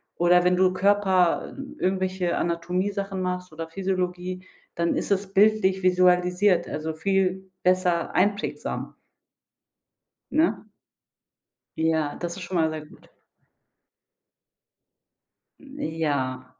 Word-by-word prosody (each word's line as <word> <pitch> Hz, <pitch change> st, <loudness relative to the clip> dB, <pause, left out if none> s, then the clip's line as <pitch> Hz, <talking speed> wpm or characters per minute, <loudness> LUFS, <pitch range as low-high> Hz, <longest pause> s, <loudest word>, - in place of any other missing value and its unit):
Oder 175 Hz, +1 st, +4 dB
wenn 180 Hz, 0 st, +4 dB
du 185 Hz, 0 st, +3 dB
Körper, 190 Hz, -2 st, +2 dB
hm, 275 Hz, 0 st, -9 dB
irgendwelche 185 Hz, -1 st, 0 dB
Anatomiesachen 185 Hz, +3 st, -2 dB
machst 180 Hz, 0 st, -3 dB
oder 165 Hz, +1 st, -6 dB
Physiologie, 185 Hz, 0 st, -3 dB, 0.3 s
dann 170 Hz, 0 st, 0 dB
ist -, -, -2 dB
es 195 Hz, 0 st, 0 dB
bildlich 200 Hz, -2 st, +3 dB
visualisiert, 180 Hz, 0 st, +3 dB
also 155 Hz, +1 st, -4 dB
viel 190 Hz, +2 st, -1 dB
besser 180 Hz, -2 st, +1 dB
einprägsam. 205 Hz, +3 st, -1 dB, 1.4 s
Ne? 315 Hz, +2 st, +1 dB, 1.1 s
Ja, 160 Hz, -2 st, 0 dB
das 175 Hz, +1 st, -5 dB
ist 190 Hz, -, -7 dB
schon 180 Hz, +1 st, -6 dB
mal 160 Hz, -1 st, +2 dB
sehr 155 Hz, -1 st, -6 dB
gut. -, -, -19 dB, 2.5 s
N 280 Hz, +1 st, -12 dB, 0.2 s
ja. 130 Hz, -4 st, -1 dB
180 Hz, 105 wpm, -25 LUFS, 170-190 Hz, 2.5 s, Oder